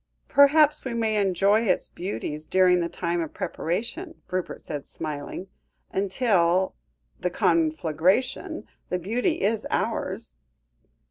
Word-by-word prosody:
'" -, -, -46 dB
"Perhaps 295 Hz, +2 st, +5 dB
we 255 Hz, -3 st, -3 dB
may 220 Hz, -2 st, +1 dB
enjoy 200 Hz, +2 st, +3 dB
its 185 Hz, -, +1 dB
beauties 155 Hz, -4 st, -5 dB
during 185 Hz, -1 st, +4 dB
the 170 Hz, -1 st, -1 dB
time 170 Hz, 0 st, -2 dB
of 160 Hz, -, -5 dB
preparation," 240 Hz, -, -3 dB, 0.2 s
Rupert 185 Hz, -1 st, -3 dB
said 145 Hz, -3 st, -5 dB
smiling; 155 Hz, +3 st, -5 dB, 0.5 s
"until 190 Hz, -3 st, +2 dB, 0.5 s
the 180 Hz, -, 0 dB
conflagration, 165 Hz, -, +1 dB, 0.2 s
the 180 Hz, -, 0 dB
beauty 240 Hz, -, -1 dB
is 215 Hz, +1 st, 0 dB
ours." 60 Hz, -, -2 dB
185 Hz, 120 wpm, -26 LUFS, 170-225 Hz, 0.5 s, Perhaps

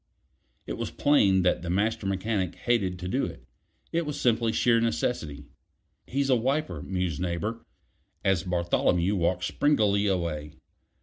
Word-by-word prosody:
It -, -, -5 dB
was -, -, -3 dB
plain 100 Hz, -10 st, +3 dB
that 90 Hz, -, +2 dB
the 85 Hz, -, -5 dB
Master 105 Hz, +3 st, 0 dB
Mechanic 95 Hz, -1 st, -1 dB
hated 100 Hz, -7 st, 0 dB
to 90 Hz, 0 st, -6 dB
do 95 Hz, -, 0 dB
it; 65 Hz, -, -9 dB, 0.5 s
it 170 Hz, +1 st, 0 dB
was 150 Hz, -2 st, -4 dB
simply 115 Hz, -2 st, +2 dB
sheer 115 Hz, +1 st, +3 dB
necessity. 115 Hz, -, -2 dB, 0.6 s
"He's 135 Hz, +1 st, 0 dB
a -, -, +6 dB
wiper," 130 Hz, -, -1 dB
mused 90 Hz, -4 st, -2 dB
Neighbor, 95 Hz, +6 st, -3 dB, 0.6 s
as 95 Hz, -3 st, +3 dB
Bartholomew 90 Hz, +1 st, +1 dB
walked 90 Hz, 0 st, 0 dB
springily 105 Hz, -3 st, +2 dB
away. 85 Hz, -6 st, -2 dB
95 Hz, 140 wpm, -27 LUFS, 90-115 Hz, 0.6 s, a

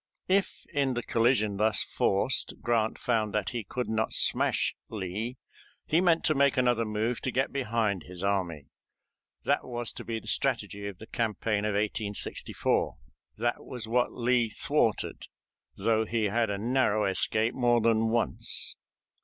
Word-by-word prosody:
If 195 Hz, +1 st, 0 dB
in 135 Hz, -3 st, +1 dB
the 120 Hz, -, -2 dB
collision 115 Hz, -4 st, +2 dB
thus 105 Hz, -1 st, +4 dB
forced 100 Hz, +7 st, +1 dB
Grant 115 Hz, -2 st, +1 dB
found 110 Hz, -4 st, 0 dB
that 105 Hz, -2 st, 0 dB
he 120 Hz, -2 st, -3 dB
could 125 Hz, +6 st, -4 dB
not 110 Hz, 0 st, 0 dB
smash -, -, +3 dB, 0.2 s
Lee, 110 Hz, +4 st, -4 dB, 0.5 s
he 165 Hz, +3 st, +2 dB
meant 170 Hz, -3 st, +3 dB
to 155 Hz, -, +3 dB
make 140 Hz, -2 st, +3 dB
another 120 Hz, -2 st, +2 dB
move 110 Hz, +3 st, -1 dB
to -, -, -2 dB
get 130 Hz, +2 st, 0 dB
behind 115 Hz, -7 st, 0 dB
his 90 Hz, 0 st, -8 dB
army. 90 Hz, -7 st, -1 dB, 0.7 s
That -, -, +1 dB
was 120 Hz, -2 st, -4 dB
to -, -, -9 dB
be 115 Hz, -1 st, -3 dB
the -, -, -18 dB
strategy 100 Hz, 0 st, 0 dB
of 100 Hz, -3 st, -7 dB
the 110 Hz, -, -10 dB
campaign 110 Hz, -2 st, -1 dB
of 105 Hz, -1 st, 0 dB
1864. 105 Hz, 0 st, -1 dB, 0.4 s
That 120 Hz, +2 st, -1 dB
was 120 Hz, -3 st, -7 dB
what 120 Hz, +2 st, +1 dB
Lee 120 Hz, -1 st, +1 dB
thwarted, 140 Hz, -, 0 dB, 0.5 s
though 110 Hz, +2 st, +2 dB
he 115 Hz, -1 st, 0 dB
had 115 Hz, +2 st, +1 dB
a 100 Hz, -, -1 dB
narrow 110 Hz, -1 st, +1 dB
escape 110 Hz, +4 st, +1 dB
more 120 Hz, -2 st, +3 dB
than 115 Hz, 0 st, +2 dB
once. 115 Hz, 0 st, 0 dB
115 Hz, 155 wpm, -28 LUFS, 105-125 Hz, 0.7 s, thus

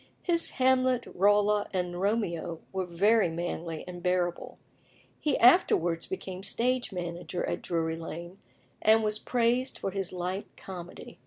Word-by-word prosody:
His 335 Hz, -2 st, +2 dB
Hamlet, 255 Hz, -1 st, +3 dB
Rolla, 205 Hz, +2 st, +3 dB
and 180 Hz, -1 st, -2 dB
Romeo 175 Hz, -6 st, -1 dB
were 190 Hz, -1 st, -2 dB
very 200 Hz, +3 st, +3 dB
manly 165 Hz, -1 st, -4 dB
and 175 Hz, -1 st, -7 dB
bearable. 180 Hz, -1 st, -1 dB, 0.6 s
He 300 Hz, -3 st, +1 dB
afterwards 175 Hz, -, +4 dB
became 190 Hz, 0 st, -5 dB
stage 245 Hz, +4 st, 0 dB
manager 175 Hz, -1 st, -4 dB
at -, -, -3 dB
Drury 165 Hz, -1 st, -1 dB
Lane, 170 Hz, +3 st, -8 dB, 0.4 s
and 220 Hz, +1 st, +5 dB
was 215 Hz, 0 st, +1 dB
praised 245 Hz, +2 st, +1 dB
for 195 Hz, -, -3 dB
his 195 Hz, -1 st, -3 dB
light 185 Hz, +2 st, -3 dB
comedy. 180 Hz, -2 st, -9 dB
190 Hz, 135 wpm, -29 LUFS, 175-225 Hz, 0.6 s, and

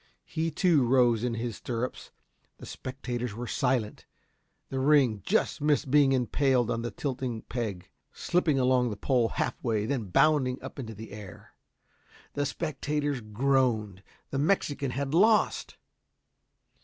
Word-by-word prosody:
He, 160 Hz, +1 st, -2 dB
too, 165 Hz, -5 st, +3 dB
rose 120 Hz, -2 st, +3 dB
in 120 Hz, -2 st, -1 dB
his 115 Hz, -3 st, -4 dB
stirrups. 120 Hz, +5 st, -4 dB, 0.5 s
The -, -, -11 dB
spectators 125 Hz, -4 st, -5 dB
were 120 Hz, +2 st, -5 dB
silent. 125 Hz, -4 st, -1 dB, 0.6 s
The 135 Hz, -, -3 dB
ring 130 Hz, -7 st, +3 dB
just -, -, 0 dB
missed 145 Hz, -2 st, +1 dB
being 145 Hz, -2 st, +5 dB
impaled 130 Hz, -1 st, +2 dB
on 115 Hz, -, -1 dB
the 120 Hz, -, -3 dB
tilting 125 Hz, -5 st, -4 dB
peg, 110 Hz, -7 st, -4 dB, 0.2 s
slipping 165 Hz, -5 st, +1 dB
along 125 Hz, -1 st, +3 dB
the 105 Hz, -, -5 dB
pole 120 Hz, 0 st, +1 dB
half -, -, -3 dB
way 110 Hz, -3 st, 0 dB
then 130 Hz, -3 st, -2 dB
bounding 135 Hz, +3 st, +2 dB
up -, -, -8 dB
into 115 Hz, -4 st, -6 dB
the 110 Hz, +1 st, -10 dB
air. 100 Hz, -3 st, -11 dB, 0.8 s
The 145 Hz, 0 st, -1 dB
spectators 145 Hz, -3 st, -2 dB
groaned. 110 Hz, -3 st, 0 dB, 0.3 s
The 135 Hz, -, -1 dB
Mexican 145 Hz, -4 st, 0 dB
had 135 Hz, +3 st, -3 dB
lost. 210 Hz, +5 st, +3 dB
130 Hz, 140 wpm, -28 LUFS, 115-140 Hz, 0.8 s, being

